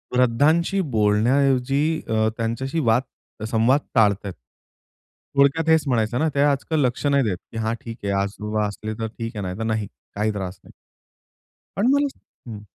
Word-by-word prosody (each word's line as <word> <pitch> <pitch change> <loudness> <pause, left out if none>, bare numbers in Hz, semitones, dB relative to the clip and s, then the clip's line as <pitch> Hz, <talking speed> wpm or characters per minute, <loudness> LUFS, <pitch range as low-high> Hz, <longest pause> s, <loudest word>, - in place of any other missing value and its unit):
वृद्धांशी 150 +10 +3 0.2
बोलण्याऐवजी 135 +8 +2
अ, 110 0 +1
त्यांच्याशी 115 +7 -2
वाद 120 -4 -2
संवाद 120 +5 +3 0.2
टाळताहेत. 100 -3 +2 1.0
थोडक्यात 140 +4 +3
हेच 160 -1 +5
म्हणायचं 120 -1 +1
ना, 160 +1 +2
ते 140 - +3
आजकाल 145 +2 +1
लक्ष 125 +3 -2
नाही 140 -1 +3
देत 100 -6 -1
की 115 - -7
"हा, 110 0 -1
ठीक 115 -1 -8
आहे 100 - 0
आज 100 0 -2 0.4
असले, 110 +1 -5
तर 110 - -2
ठीक 115 +1 -7
आहे, 105 - -3
नाहीतर 95 +4 -4
नाही, 110 -2 -1 0.3
काही 105 +1 0
त्रास 95 -2 -5
नाही." - - -17 1.0
पण 205 +5 +2
मला 285 0 +3 0.4
हं. 105 -2 -8
115 Hz, 155 wpm, -23 LUFS, 110-140 Hz, 1.0 s, हेच